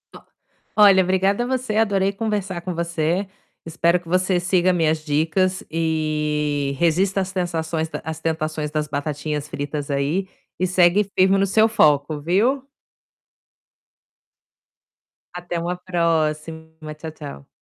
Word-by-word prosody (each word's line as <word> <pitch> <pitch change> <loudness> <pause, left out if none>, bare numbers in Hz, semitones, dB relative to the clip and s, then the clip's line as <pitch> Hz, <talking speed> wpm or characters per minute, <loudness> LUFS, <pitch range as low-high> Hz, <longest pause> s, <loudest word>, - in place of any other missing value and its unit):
Ó, - - -12 0.6
olha, 200 -3 +7
obrigada 190 +5 +1
você, 255 -4 -2
adorei 200 -3 +2
conversar 200 -4 -3
com 180 +1 -4
você. 170 +2 -1 0.4
Espero 170 +2 +1
que 175 - -19
você 185 +1 +1
siga 180 0 +2
minhas 160 -2 0
dicas 165 +5 0
e 150 -3 -1
resista 185 +4 +2
às 190 - -2
sensações 165 -3 -2
às 160 0 -5
tentações 155 -2 -2
das 150 -1 -1
batatinhas 150 +1 -3
fritas 145 0 -4
aí 145 +8 0 0.3
e 185 - +2
segue 180 +2 +4
firme 190 +1 +5
no 195 - +3
seu 220 +3 +4
foco, 150 -8 +2
viu. 210 - +1 2.7
Até 175 -1 -4
uma 175 +2 -3
próxima. 160 -3 -1 0.3
Tchau, 160 +1 -7
tchau. 145 - -10
170 Hz, 125 wpm, -22 LUFS, 155-190 Hz, 2.7 s, olha